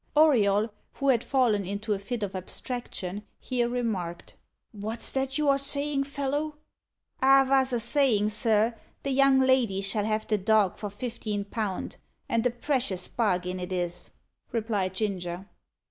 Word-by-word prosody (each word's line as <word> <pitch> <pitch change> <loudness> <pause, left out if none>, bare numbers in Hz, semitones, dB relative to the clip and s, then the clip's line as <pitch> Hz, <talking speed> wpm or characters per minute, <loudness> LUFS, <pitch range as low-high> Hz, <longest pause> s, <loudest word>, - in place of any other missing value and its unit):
Auriol, 220 -8 +4 0.2
who 275 - 0
had 245 -3 +3
fallen 240 -7 +2
into 205 +3 -2
a 200 - -2
fit 220 +3 -4
of 195 -1 -4
abstraction, 200 -1 -5 0.2
here 240 -2 -1
remarked: 205 -9 -3 0.4
"What's 220 +1 -3
that 270 +1 -1
you 300 -1 +1
are 275 0 +4
saying, 280 0 0
fellow?" 285 +2 -2 0.7
"I 270 +1 +7
vos 265 0 +3
a 240 - +1
sayin', 225 -5 +3
sir, 220 0 +2 0.3
the 275 - -1
young 270 0 +5
lady 255 -7 +3
shall 205 +1 +1
have 215 0 -1
the 215 -2 +1
dog 205 -1 +3
for 205 - -4
fifteen 210 -2 -4
pound, 205 -2 -4 0.3
and 230 -1 +1
a - - +1
precious 240 -6 -1
bargin 185 -5 0
it 180 +1 -5
is," 175 -1 -2 0.4
replied 210 -5 -1
Ginger. 185 -3 -3
225 Hz, 150 wpm, -27 LUFS, 200-265 Hz, 0.7 s, I